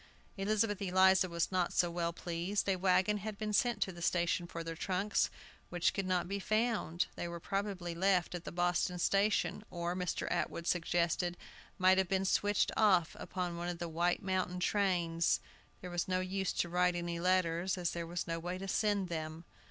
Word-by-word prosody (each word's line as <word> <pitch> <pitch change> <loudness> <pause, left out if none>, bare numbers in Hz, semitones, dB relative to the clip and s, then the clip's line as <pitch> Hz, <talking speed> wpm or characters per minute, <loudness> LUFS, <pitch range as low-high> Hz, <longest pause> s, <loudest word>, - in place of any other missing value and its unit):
Elizabeth 205 +1 0
Eliza 190 0 +4
was 170 +1 -1
not 180 -2 +1
so 175 -1 +2
well 170 0 -1
pleased. 175 +4 -2
A 195 - +3
wagon 185 +2 +2
had 210 +1 -5
been 215 0 -3
sent 240 +2 +2
to 190 - -5
the 175 -1 -11
station 175 0 +1
for 170 -1 -6
their 165 0 -5
trunks, 190 +4 0 0.4
which 175 -1 +1
could 195 -1 -2
not 180 -2 +1
be 200 +2 -2
found; 215 -5 0
they 175 - -4
were 170 0 -6
probably 195 -2 -3
left 180 +1 +2
at 175 -1 -5
the - - -6
Boston 175 +1 0
station, 200 +3 +1
or, 175 0 -3
Mr. 180 -2 -2
Atwood 170 - -2
suggested, 175 0 0 0.4
might 185 +1 +5
have 190 - +1
been 195 0 +1
switched 205 +1 +2
off 185 -7 +3
upon 180 -2 -3
one 175 +1 -3
of 175 - -4
the 170 0 -4
White 170 +3 0
Mountain 185 -1 -1
trains. 175 -4 +1 0.4
There 180 - -7
was 175 0 -1
no 185 0 +1
use 190 +1 -1
to - - 0
write 180 +1 +2
any 170 -1 -3
letters, 180 0 +1
as 175 -2 -1
there 170 -1 -4
was 175 +1 -3
no 165 -1 -3
way 175 +2 -4
to 195 +1 -6
send 205 -1 +1
them. 160 0 -5
180 Hz, 190 wpm, -34 LUFS, 170-195 Hz, 0.4 s, might